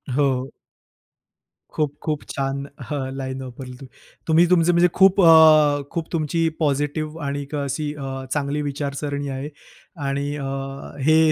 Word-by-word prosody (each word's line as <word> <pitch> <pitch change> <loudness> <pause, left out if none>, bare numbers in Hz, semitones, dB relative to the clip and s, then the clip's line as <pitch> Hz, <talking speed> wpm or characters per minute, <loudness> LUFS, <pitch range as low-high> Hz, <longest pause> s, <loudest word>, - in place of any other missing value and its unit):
हो. 135 -2 +1 1.2
खूप-खूप 150 0 -2
छान. 140 0 -2 0.2
हां, 145 -2 -2 0.2
लाईन 130 0 -4
वापरली 125 0 -8
तुम्ही. 135 - -11 0.4
तुम्ही 165 +2 +5
तुमचं 175 -1 +4
म्हणजे 175 +1 +5
खूप 190 0 +5
अ, 155 -3 +7
खूप 165 -1 -4
तुमची 165 +1 0
पॉझिटिव्ह 150 +2 -1
आणि 140 +1 -2
एक 140 +2 -7
अशी 145 +1 -2
अ, 135 -2 -5
चांगली 145 0 -1
विचारसरणी 145 0 -3
आहे 140 +3 -5 0.6
आणि 140 +1 -1
अ, 140 - -5 0.6
हे 155 +3 +4
145 Hz, 135 wpm, -22 LUFS, 140-155 Hz, 1.2 s, अ